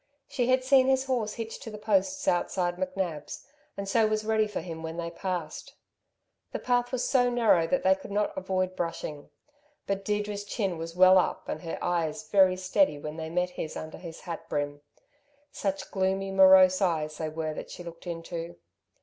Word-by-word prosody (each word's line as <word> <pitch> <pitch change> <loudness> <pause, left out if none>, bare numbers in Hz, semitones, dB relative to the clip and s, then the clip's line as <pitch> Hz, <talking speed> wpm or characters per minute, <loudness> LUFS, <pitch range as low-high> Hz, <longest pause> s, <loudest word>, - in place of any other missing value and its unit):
She 245 -2 -1
had 255 0 +3
seen 260 0 +5
his 265 0 +2
horse 240 -5 -1
hitched 225 -1 -6
to - - -7
the 210 - -8
posts 215 +7 0
outside 175 0 +1
McNab's, 185 -5 -4 0.3
and 200 0 -4
so 220 +2 +3
was 215 0 -1
ready 220 -1 +2
for 210 - -4
him 165 -1 -7
when 160 +1 -6
they 170 -1 -3
passed. 175 -3 -5 0.8
The - - -1
path 245 0 0
was 255 -2 -1
so 245 -2 +3
narrow 225 -9 +3
that 270 - 0
they 190 - +6
could 190 +1 -8
not 205 +1 0
avoid 185 0 -1
brushing. 155 -3 -4 0.6
But 195 0 -2
Deirdre's 205 0 -2
chin 195 -5 -2
was 165 +1 -6
well 185 +1 +7
up - - -2
and 155 - -4
her 165 - -5
eyes 175 +4 -1
very 190 -3 +4
steady 185 -4 +2
when 150 +2 -7
they 160 0 -5
met 180 +2 0
his 160 -3 -5
under 155 0 -7
his 165 -2 -9
hat 170 - -7
brim. 145 0 -2 0.7
Such 195 -1 -3
gloomy, 195 0 0
morose 190 0 +7
eyes 155 -4 0
they 160 -1 -2
were 155 0 -3
that - - -7
she 175 - -8
looked 170 +1 -10
into. 170 0 -5
185 Hz, 190 wpm, -28 LUFS, 165-210 Hz, 0.8 s, well